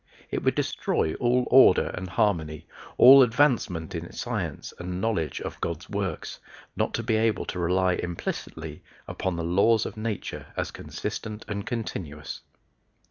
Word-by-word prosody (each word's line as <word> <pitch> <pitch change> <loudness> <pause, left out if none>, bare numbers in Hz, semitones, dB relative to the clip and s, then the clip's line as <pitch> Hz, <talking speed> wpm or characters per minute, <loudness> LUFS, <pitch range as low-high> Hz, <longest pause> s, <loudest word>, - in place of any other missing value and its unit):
It - - -1
would - - +2
destroy 80 - 0
all 125 +1 +2
order 130 -8 +7
and 95 +1 -5
harmony, 85 -6 0 0.3
all 135 +2 +10
advancement 115 - +2
in - - -5
science - - -4
and 90 0 -4
knowledge 95 -7 -1
of - - -7
God's 85 +2 -4
works, 95 -5 -3 0.4
not - - -1
to 115 - -2
be 110 -1 +1
able 110 0 +1
to 90 - -5
rely 90 +1 +2
implicitly 85 -1 -5 0.3
upon 95 -2 -3
the 85 - -3
laws 100 +6 +3
of - - -6
nature 110 -2 -4
as - - -2
consistent 110 -1 -6
and 100 -2 -4
continuous. 85 -10 -5
95 Hz, 145 wpm, -26 LUFS, 85-115 Hz, 0.4 s, all